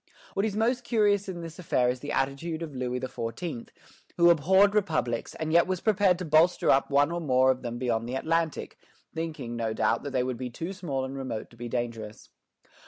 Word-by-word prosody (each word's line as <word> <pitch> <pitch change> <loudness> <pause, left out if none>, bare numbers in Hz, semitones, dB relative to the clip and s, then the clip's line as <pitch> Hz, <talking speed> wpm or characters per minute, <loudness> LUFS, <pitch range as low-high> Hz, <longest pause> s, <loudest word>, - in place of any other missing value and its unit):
What 195 +3 +1
is 205 - -4
most 240 +3 +1
curious 205 -4 +2
in 175 -2 -5
this 165 +1 -9
affair 125 -8 +1
is 125 +1 0
the 145 +3 -6
attitude 160 +5 -2
of 155 -3 -7
Louis 125 0 -2
XIV., 125 +2 -5 0.5
who 170 0 +7
abhorred 190 +6 +4
republics, 155 - -1
and 160 0 -3
yet 170 +1 +5
was 185 -1 -1
prepared 200 -4 +3
to 180 - -5
bolster 160 +3 +4
up 135 - +3
one 145 +2 +3
or 170 0 -2
more 130 -3 +4
of 130 0 -3
them 120 -1 -4
beyond 120 -2 -1
the 130 - -3
Atlantic, 165 +3 -1 0.3
thinking, 160 -7 -4
no 115 -1 -2
doubt, - - +1
that 145 - -5
they 130 -2 0
would 125 -1 -3
be 125 0 -4
too 165 +10 -5
small 145 -9 -3
and 135 +1 -6
remote 130 -5 -5
to - - -16
be 120 0 -7
dangerous. 115 -3 -5
145 Hz, 210 wpm, -28 LUFS, 125-175 Hz, 0.5 s, who